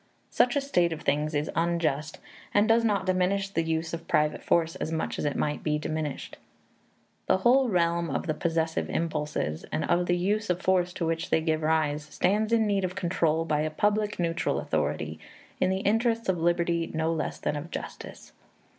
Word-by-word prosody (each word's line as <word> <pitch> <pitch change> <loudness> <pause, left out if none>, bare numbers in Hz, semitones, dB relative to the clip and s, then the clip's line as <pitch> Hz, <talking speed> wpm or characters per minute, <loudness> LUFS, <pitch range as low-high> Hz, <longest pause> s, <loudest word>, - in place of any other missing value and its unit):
Such 245 +1 +3
a 285 - +2
state 180 -12 +1
of 160 - -7
things 150 +2 0
is 145 +1 -1
unjust, 165 -3 0 0.4
and 205 +1 +5
does 230 +1 +4
not 205 -4 +1
diminish 185 +1 +1
the 180 -4 0
use 160 0 -2
of 165 0 -6
private 150 0 +1
force 165 -1 +1
as 155 - -3
much 160 - -2
as - - -2
it 145 - 0
might 150 0 -1
be 150 -1 0
diminished. 155 -2 -4 0.9
The 190 - +4
whole 250 +6 +4
realm 170 -3 +1
of 135 - -2
the 155 - 0
possessive 160 0 -1
impulses, 150 - -2
and 80 +2 -1
of 175 0 +1
the 175 - +2
use 205 +4 0
of 180 0 +1
force 185 -1 +2
to 175 - -2
which 165 +1 -2
they - - +3
give 160 -1 0
rise, 155 -1 +1
stands 210 +8 0
in 225 -1 +4
need 200 -2 +1
of 185 0 -2
control 165 -2 +1
by 150 -2 +1
a 155 - 0
public 210 +5 0
neutral 170 -1 0
authority, - - -2 0.4
in 185 - +2
the 190 0 0
interests 225 +2 +1
of 185 -2 +1
liberty 170 0 +1
no 160 +1 +1
less 160 - -3
than - - -2
of 150 +3 -5
justice. - - -8
170 Hz, 195 wpm, -27 LUFS, 155-190 Hz, 0.9 s, and